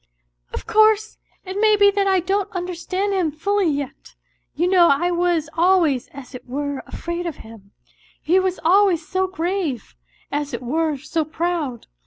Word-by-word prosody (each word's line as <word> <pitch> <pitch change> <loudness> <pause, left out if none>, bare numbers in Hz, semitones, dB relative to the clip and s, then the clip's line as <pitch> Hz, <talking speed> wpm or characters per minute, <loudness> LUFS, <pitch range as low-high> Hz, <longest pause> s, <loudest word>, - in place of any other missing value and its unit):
" - - -47
Of - - -6
course, 435 0 +3 0.3
it 380 +2 -4
may 430 -1 +5
be 405 -1 +5
that 400 -1 0
I 380 -2 +3
don't 390 +3 -1
understand 365 +2 -2
him 365 -4 +1
fully 395 +5 0
yet. 280 -3 -5 0.4
You 345 +4 +1
know 360 -2 +5
I 335 +5 +2
was 345 -3 +1
always 330 -6 +2
as 280 -1 -12
it 250 - -10
were 285 +1 -3
afraid 340 +1 -4
of 325 - -4
him; 220 -3 -14 0.5
he 360 +4 +2
was 375 -1 -1
always 360 -2 +3
so 375 +1 0
grave, 345 - -3 0.4
as 290 0 -2
it - - -7
were 310 +4 0
so 310 +4 -2
proud. 315 -5 -3
345 Hz, 170 wpm, -21 LUFS, 290-380 Hz, 0.5 s, may